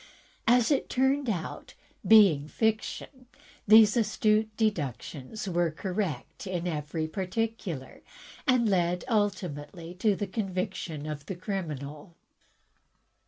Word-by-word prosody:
As 245 +3 +4
it 280 - +1
turned 265 0 +1
out, 175 -7 -4 0.3
being 195 -10 +6
fiction, 220 - -2 0.4
these 215 0 +8
astute 215 -1 +2
deductions 170 - -3
were 175 -2 +1
correct 185 +3 -4
in 180 -2 -3
every 155 -1 -2
particular, 190 - -4 0.5
and 250 -3 +4
led 180 -3 +1
ultimately 180 - -2
to 210 0 +3
the 205 - -2
conviction 185 -6 -3
of 150 -2 -6
the 190 - -4
criminal! 165 -4 -5
190 Hz, 105 wpm, -28 LUFS, 160-220 Hz, 0.5 s, these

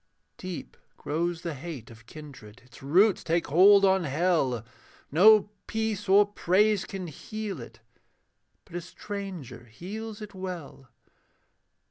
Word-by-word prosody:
Deep 185 -2 -7 0.2
grows 170 +3 -2
the 170 - -3
hate 140 -5 -8
of 115 0 -16
kindred, 130 -7 -12
Its 125 - -17
roots 185 +9 +3
take 170 +1 0
hold 195 +6 +6
on 190 -1 +3
hell; 140 - 0 0.5
No 205 +6 +6 0.2
peace 220 -3 -2
or 200 +2 +7
praise 205 +1 +2
can 195 -2 -6
heal 195 - -6
it, 115 -1 -12 0.8
But - - -19
a 175 - -2
stranger 175 - -8
heals 210 - -8
it 210 -1 -9
well. 180 -8 -8
175 Hz, 125 wpm, -27 LUFS, 140-205 Hz, 0.8 s, or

